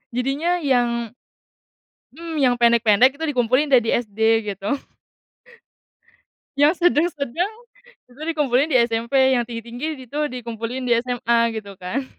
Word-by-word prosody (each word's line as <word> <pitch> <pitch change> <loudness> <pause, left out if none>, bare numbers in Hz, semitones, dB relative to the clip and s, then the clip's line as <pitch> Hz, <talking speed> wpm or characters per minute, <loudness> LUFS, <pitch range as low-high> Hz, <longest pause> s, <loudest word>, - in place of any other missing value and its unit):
jadinya 275 +8 0
yang 240 -4 0 1.0
mmm, 330 +3 -7
yang 260 -4 +3
pendek-pendek 235 +2 +4
itu 320 - -5
dikumpulin 255 +3 +1
deh 255 - +7
di 225 - -5
SD 220 -3 -2 0.3
gitu. 195 +1 -7 1.9
Yang 305 +5 +3
sedeng 345 -2 +4
sedeng, 300 - -3 0.6
itu 255 +4 -16
dikumpulin 300 -3 0
di 265 - +3
SMP 235 0 0 0.2
yang 245 -2 +1
tinggi 230 -1 -6
tinggi 245 +6 -5 0.2
itu 285 +5 -6
dikumpulin 240 +1 -5
di 240 - +3
SMA 240 -1 0 0.2
gitu 200 -2 -8
kan, 240 +10 -3
250 Hz, 135 wpm, -21 LUFS, 235-285 Hz, 1.9 s, deh